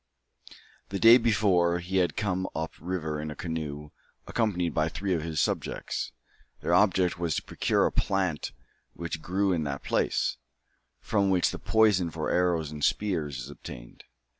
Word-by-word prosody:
The 100 Hz, -, -2 dB
day 115 Hz, +4 st, +8 dB
before, 95 Hz, -7 st, +3 dB
he 90 Hz, +2 st, -2 dB
had 90 Hz, -2 st, +1 dB
come 95 Hz, -3 st, -1 dB
up 80 Hz, +1 st, -3 dB
the -, -, -18 dB
river 80 Hz, -4 st, -2 dB
in 75 Hz, -, -4 dB
a 75 Hz, -, -6 dB
canoe, 75 Hz, -3 st, -5 dB, 0.3 s
accompanied 90 Hz, -8 st, 0 dB
by 80 Hz, +1 st, +1 dB
three 95 Hz, +4 st, -2 dB
of 85 Hz, -, 0 dB
his 80 Hz, -1 st, -3 dB
subjects. -, -, -2 dB, 0.5 s
Their 85 Hz, -, 0 dB
object 90 Hz, -2 st, +3 dB
was 85 Hz, -3 st, 0 dB
to -, -, -2 dB
procure -, -, +1 dB
a -, -, +1 dB
plant 95 Hz, -6 st, 0 dB, 0.4 s
which 85 Hz, -2 st, -5 dB
grew 95 Hz, +2 st, +1 dB
in 80 Hz, -3 st, 0 dB
that 70 Hz, -1 st, -4 dB
place, -, -, 0 dB, 0.6 s
from 100 Hz, -2 st, +1 dB
which 90 Hz, -2 st, +3 dB
the -, -, -6 dB
poison 105 Hz, -6 st, +3 dB
for -, -, -3 dB
arrows 85 Hz, -4 st, +1 dB
and 75 Hz, -1 st, -6 dB
spears 80 Hz, -10 st, 0 dB
is 65 Hz, +3 st, -7 dB
obtained. -, -, -11 dB
85 Hz, 165 wpm, -28 LUFS, 80-95 Hz, 0.6 s, day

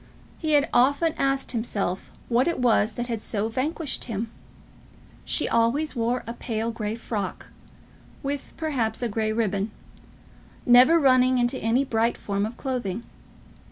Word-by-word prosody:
He 310 Hz, -2 st, 0 dB
had 290 Hz, 0 st, +4 dB
often 285 Hz, +6 st, +3 dB
asked 270 Hz, 0 st, 0 dB
himself 205 Hz, -6 st, -2 dB, 0.2 s
what 245 Hz, +4 st, +2 dB
it 340 Hz, -, 0 dB
was 230 Hz, -3 st, +3 dB
that 240 Hz, +2 st, -3 dB
had 230 Hz, -3 st, -3 dB
so 215 Hz, 0 st, -1 dB
vanquished 290 Hz, +5 st, -3 dB
him. 225 Hz, -1 st, -4 dB, 0.9 s
She -, -, +1 dB
always 240 Hz, +7 st, +1 dB
wore 240 Hz, +1 st, 0 dB
a 230 Hz, -, -5 dB
pale 225 Hz, -1 st, -3 dB
grey 220 Hz, -2 st, -3 dB
frock, 210 Hz, -4 st, -5 dB, 0.7 s
with, 280 Hz, 0 st, -4 dB
perhaps, 250 Hz, -8 st, -1 dB
a -, -, +1 dB
grey 215 Hz, 0 st, -1 dB
ribbon, 210 Hz, -2 st, 0 dB, 1.0 s
never 250 Hz, +7 st, +7 dB
running 255 Hz, -2 st, +4 dB
into 245 Hz, +2 st, +1 dB
any 240 Hz, +5 st, +1 dB
bright 230 Hz, -1 st, +1 dB
form 200 Hz, 0 st, -2 dB
of 235 Hz, -, -9 dB
clothing. 235 Hz, -6 st, -3 dB
240 Hz, 145 wpm, -25 LUFS, 220-265 Hz, 1.0 s, never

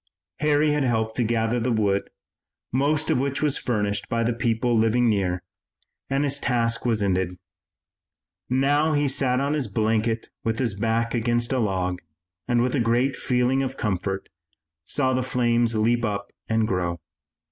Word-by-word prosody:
Harry 150 Hz, 0 st, +3 dB
had 150 Hz, -1 st, +1 dB
helped 110 Hz, -3 st, 0 dB
to 120 Hz, -, +1 dB
gather 115 Hz, +1 st, 0 dB
the 120 Hz, +2 st, 0 dB
wood, 100 Hz, -3 st, +1 dB, 0.6 s
most 145 Hz, +4 st, +1 dB
of -, -, +2 dB
which 140 Hz, +2 st, -1 dB
was 145 Hz, -2 st, +1 dB
furnished 105 Hz, -4 st, -1 dB
by 115 Hz, 0 st, 0 dB
the 120 Hz, +1 st, +1 dB
people 120 Hz, 0 st, 0 dB
living 115 Hz, +2 st, +3 dB
near, 95 Hz, -4 st, 0 dB, 0.7 s
and 135 Hz, +1 st, +1 dB
his 140 Hz, 0 st, 0 dB
task 115 Hz, -2 st, 0 dB
was 110 Hz, -3 st, +1 dB
ended. 95 Hz, -2 st, 0 dB, 1.1 s
Now 145 Hz, +4 st, +2 dB
he 145 Hz, -1 st, +2 dB
sat 130 Hz, -1 st, +1 dB
on 140 Hz, +2 st, 0 dB
his 150 Hz, -4 st, -1 dB
blanket 110 Hz, 0 st, 0 dB
with 115 Hz, 0 st, -1 dB
his 120 Hz, -4 st, 0 dB
back 115 Hz, +3 st, 0 dB
against 120 Hz, +1 st, 0 dB
a 130 Hz, -, +1 dB
log 95 Hz, -4 st, -1 dB, 0.5 s
and, 120 Hz, -1 st, +2 dB
with 125 Hz, -, 0 dB
a 140 Hz, -, +1 dB
great 120 Hz, +3 st, +2 dB
feeling 125 Hz, +1 st, +1 dB
of 135 Hz, 0 st, -3 dB
comfort, 95 Hz, -1 st, -2 dB, 0.6 s
saw 130 Hz, -, 0 dB
the 130 Hz, -, +1 dB
flames 120 Hz, -2 st, +1 dB
leap 115 Hz, +2 st, +2 dB
up 100 Hz, -2 st, -3 dB, 0.2 s
and 110 Hz, -1 st, +2 dB
grow. 90 Hz, -3 st, -1 dB
120 Hz, 165 wpm, -24 LUFS, 110-130 Hz, 1.1 s, Harry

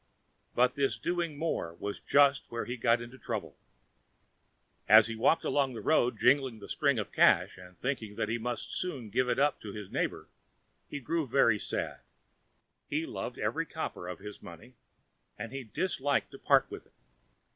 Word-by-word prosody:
But 125 Hz, +1 st, +4 dB
this 140 Hz, -1 st, 0 dB
doing 170 Hz, -4 st, -2 dB
more 145 Hz, -, -2 dB
was 100 Hz, +3 st, -5 dB
just 140 Hz, -1 st, +4 dB
where 115 Hz, 0 st, -3 dB
he 120 Hz, -, -4 dB
got 115 Hz, 0 st, +2 dB
into 125 Hz, +2 st, -12 dB
trouble. 110 Hz, -7 st, -4 dB, 1.3 s
As 110 Hz, +1 st, +9 dB
he 115 Hz, -, -4 dB
walked 125 Hz, +8 st, +3 dB
along 135 Hz, -2 st, +1 dB
the -, -, -5 dB
road 125 Hz, -6 st, +2 dB
jingling 130 Hz, -4 st, +3 dB
the 100 Hz, -, -11 dB
string 140 Hz, -3 st, +1 dB
of 105 Hz, -, -3 dB
cash, -, -, +4 dB
and 90 Hz, 0 st, -14 dB
thinking 115 Hz, -6 st, -3 dB
that 110 Hz, -, -1 dB
he 115 Hz, +2 st, -1 dB
must 120 Hz, +1 st, -4 dB
soon 135 Hz, -, -4 dB
give 130 Hz, +3 st, +1 dB
it -, -, +1 dB
up 145 Hz, +1 st, +2 dB
to 105 Hz, -2 st, -7 dB
his 105 Hz, -3 st, -8 dB
neighbour, -, -, -2 dB, 0.6 s
he 145 Hz, -, -4 dB
grew 160 Hz, +3 st, -1 dB
very 115 Hz, -4 st, +4 dB
sad. -, -, -3 dB, 0.9 s
He -, -, -1 dB
loved -, -, -5 dB
every -, -, -1 dB
copper 90 Hz, -, -5 dB
of 90 Hz, -, -5 dB
his 105 Hz, +1 st, -10 dB
money 95 Hz, +6 st, -12 dB, 0.6 s
and 115 Hz, -, -6 dB
he 135 Hz, 0 st, -5 dB
disliked 140 Hz, -, -1 dB
to -, -, -11 dB
part -, -, +3 dB
with -, -, -8 dB
it. -, -, -34 dB
120 Hz, 180 wpm, -30 LUFS, 110-140 Hz, 1.3 s, As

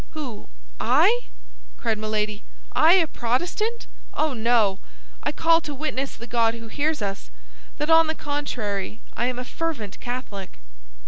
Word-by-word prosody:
"Who—I?" 120 Hz, -, +1 dB, 0.6 s
cried 220 Hz, -2 st, 0 dB
Milady; 215 Hz, -1 st, -1 dB, 0.3 s
"I 320 Hz, +2 st, +7 dB
a 365 Hz, -3 st, +6 dB
Protestant? 350 Hz, -, -1 dB, 0.3 s
Oh, 310 Hz, -2 st, +1 dB
no! 225 Hz, -4 st, +3 dB, 0.4 s
I 290 Hz, -, 0 dB
call 330 Hz, +2 st, +4 dB
to 295 Hz, -2 st, -6 dB
witness 275 Hz, -2 st, -2 dB
the 235 Hz, -, -9 dB
God 230 Hz, -1 st, +2 dB
who 230 Hz, -1 st, -9 dB
hears 295 Hz, -1 st, 0 dB
us, 195 Hz, -, -4 dB, 0.5 s
that 300 Hz, +2 st, 0 dB
on 325 Hz, 0 st, +7 dB
the 315 Hz, -, -1 dB
contrary 225 Hz, -10 st, -3 dB, 0.2 s
I 240 Hz, -, +1 dB
am 250 Hz, -1 st, -2 dB
a 250 Hz, -, -4 dB
fervent 275 Hz, -11 st, -3 dB
Catholic!" 240 Hz, -6 st, -5 dB
245 Hz, 140 wpm, -25 LUFS, 215-310 Hz, 0.6 s, I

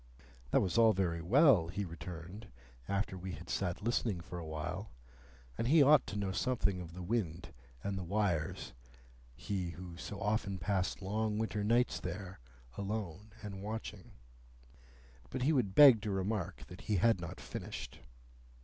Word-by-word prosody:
That -, -, +4 dB
was 95 Hz, +5 st, +1 dB
all 115 Hz, -1 st, +7 dB
very 85 Hz, -3 st, 0 dB
well, 110 Hz, -, +5 dB
he 100 Hz, +4 st, -3 dB
returned, 90 Hz, +4 st, -8 dB, 0.4 s
after 100 Hz, 0 st, -1 dB
we 95 Hz, 0 st, -6 dB
had 85 Hz, +3 st, -8 dB
sat 90 Hz, 0 st, -2 dB
listening 115 Hz, -4 st, 0 dB
for 85 Hz, +1 st, -7 dB
a 80 Hz, -, -7 dB
while, 85 Hz, +6 st, -4 dB, 0.7 s
and 115 Hz, -, +1 dB
he 150 Hz, +2 st, +7 dB
ought 145 Hz, 0 st, +6 dB
to -, -, -5 dB
know 100 Hz, -2 st, -1 dB
something 100 Hz, -4 st, 0 dB
of 85 Hz, -1 st, -9 dB
the 90 Hz, -, -6 dB
wind 90 Hz, -5 st, -2 dB, 0.3 s
and 100 Hz, -1 st, -2 dB
the -, -, -4 dB
wires,—he 65 Hz, -, -3 dB
who 85 Hz, 0 st, -8 dB
so 100 Hz, +3 st, -6 dB
often 105 Hz, -2 st, 0 dB
passed 95 Hz, +2 st, -1 dB
long 105 Hz, +2 st, -1 dB
winter 110 Hz, -2 st, -1 dB
nights 120 Hz, +4 st, +2 dB
there, 90 Hz, +1 st, -6 dB, 0.4 s
alone 100 Hz, 0 st, -4 dB
and 100 Hz, -2 st, -6 dB
watching. 105 Hz, -2 st, -6 dB, 1.2 s
But 125 Hz, -, -3 dB
he 155 Hz, +4 st, +3 dB
would 110 Hz, -9 st, +1 dB
beg 135 Hz, -7 st, +9 dB
to 110 Hz, -, -3 dB
remark 95 Hz, -, -2 dB
that 90 Hz, +6 st, -11 dB
he 105 Hz, -, -1 dB
had 110 Hz, 0 st, +3 dB
not 85 Hz, -, -6 dB
finished. -, -, -7 dB
95 Hz, 160 wpm, -34 LUFS, 85-110 Hz, 1.2 s, beg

